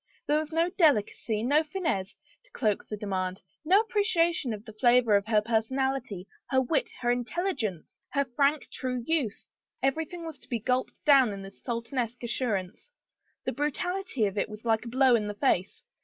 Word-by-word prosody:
There 300 Hz, +1 st, +2 dB
was 310 Hz, 0 st, -5 dB
no 335 Hz, +2 st, +1 dB
delicacy, 230 Hz, -, +2 dB
no 290 Hz, +6 st, +3 dB
finesse, 305 Hz, -, -2 dB, 0.3 s
to -, -, -27 dB
cloak 215 Hz, -, -1 dB
the 210 Hz, -, -5 dB
demand, 190 Hz, -2 st, -3 dB, 0.2 s
no 375 Hz, +7 st, +5 dB
appreciation 345 Hz, -, +1 dB
of 215 Hz, 0 st, -6 dB
the 220 Hz, -, -10 dB
flavor 240 Hz, -1 st, +4 dB
of 200 Hz, +1 st, +1 dB
her 215 Hz, -2 st, +3 dB
personality, 235 Hz, -2 st, -1 dB, 0.2 s
her 265 Hz, -, +3 dB
wit, 265 Hz, +4 st, +1 dB
her 240 Hz, -1 st, +2 dB
intelligence, 245 Hz, -, -2 dB
her 280 Hz, 0 st, +2 dB
frank, 280 Hz, +4 st, +1 dB
true 250 Hz, -2 st, -3 dB
youth; 290 Hz, -10 st, -1 dB, 0.4 s
every 275 Hz, +4 st, +1 dB
thing 340 Hz, +1 st, -8 dB
was 315 Hz, -4 st, -7 dB
to -, -, -16 dB
be 240 Hz, -, 0 dB
gulped 250 Hz, +3 st, -2 dB
down 270 Hz, -6 st, +6 dB
in 195 Hz, 0 st, -7 dB
this 195 Hz, 0 st, -12 dB
Sultanesque 235 Hz, 0 st, -3 dB
assur 235 Hz, -1 st, 0 dB
ance. 185 Hz, -, -7 dB, 0.5 s
The -, -, 0 dB
brutality 300 Hz, -, -1 dB
of 200 Hz, 0 st, -1 dB
it -, -, -1 dB
was 215 Hz, +2 st, -10 dB
like 225 Hz, 0 st, +1 dB
a -, -, -5 dB
blow 260 Hz, +1 st, +4 dB
in 210 Hz, -2 st, 0 dB
the 210 Hz, -, -4 dB
face. 205 Hz, -6 st, 0 dB
250 Hz, 185 wpm, -28 LUFS, 215-300 Hz, 0.5 s, down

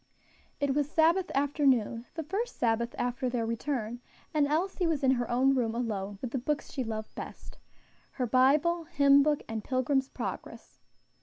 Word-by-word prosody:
It 285 Hz, -2 st, +1 dB
was 290 Hz, 0 st, 0 dB
Sabbath 335 Hz, +4 st, +3 dB
afternoon 270 Hz, -5 st, +1 dB
the 325 Hz, -, -3 dB
first 400 Hz, +10 st, -3 dB
Sabbath 235 Hz, 0 st, 0 dB
after 245 Hz, +1 st, -1 dB
their 240 Hz, -2 st, -1 dB
return 235 Hz, 0 st, -3 dB, 0.3 s
and 295 Hz, -2 st, +3 dB
Elsie 350 Hz, +4 st, 0 dB
was 310 Hz, -4 st, -1 dB
in 260 Hz, -, +5 dB
her 245 Hz, -2 st, 0 dB
own 260 Hz, +3 st, +3 dB
room 235 Hz, -4 st, 0 dB
alone 205 Hz, -4 st, -3 dB
with 250 Hz, -, -3 dB
the 265 Hz, -, -1 dB
books 290 Hz, +4 st, -2 dB
she 265 Hz, -, -2 dB
loved 220 Hz, -2 st, -5 dB
best -, -, -9 dB, 0.5 s
her 255 Hz, -, -1 dB
Bible, 295 Hz, +8 st, +3 dB
hymnbook, 285 Hz, -1 st, +4 dB
and 220 Hz, -1 st, -4 dB
"Pilgrim's 265 Hz, +1 st, 0 dB
Progress." -, -, -7 dB
265 Hz, 160 wpm, -29 LUFS, 240-295 Hz, 0.5 s, in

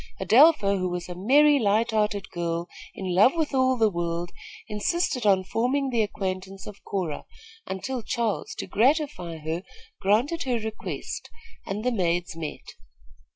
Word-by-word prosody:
Adelpha, 235 Hz, -7 st, +5 dB
who 185 Hz, 0 st, -1 dB
was 175 Hz, 0 st, -4 dB
a 180 Hz, -, -5 dB
merry, 280 Hz, +10 st, +5 dB
light 220 Hz, +1 st, +2 dB
hearted 210 Hz, -3 st, 0 dB
girl, 170 Hz, 0 st, -2 dB, 0.3 s
in 185 Hz, -2 st, -3 dB
love 210 Hz, -, +5 dB
with 315 Hz, -3 st, -1 dB
all 260 Hz, -1 st, +3 dB
the 225 Hz, -2 st, +4 dB
world, 170 Hz, 0 st, -3 dB, 0.4 s
insisted 250 Hz, -, 0 dB
on 190 Hz, -2 st, +4 dB
forming 255 Hz, +8 st, 0 dB
the 235 Hz, -2 st, +2 dB
acquaintance 190 Hz, -2 st, -4 dB
of 210 Hz, -1 st, -11 dB
Cora, 180 Hz, -7 st, -3 dB, 0.4 s
until 245 Hz, +7 st, -3 dB
Charles, 225 Hz, -1 st, -2 dB
to -, -, -5 dB
gratify 250 Hz, -, +1 dB
her, 160 Hz, +2 st, -3 dB, 0.4 s
granted 240 Hz, -, +2 dB
her 250 Hz, -3 st, 0 dB
request, 220 Hz, -1 st, -5 dB, 0.4 s
and 205 Hz, +2 st, -3 dB
the 250 Hz, -, +1 dB
maids 175 Hz, -4 st, 0 dB
met. 160 Hz, -2 st, -6 dB
205 Hz, 150 wpm, -26 LUFS, 180-250 Hz, 0.4 s, Adelpha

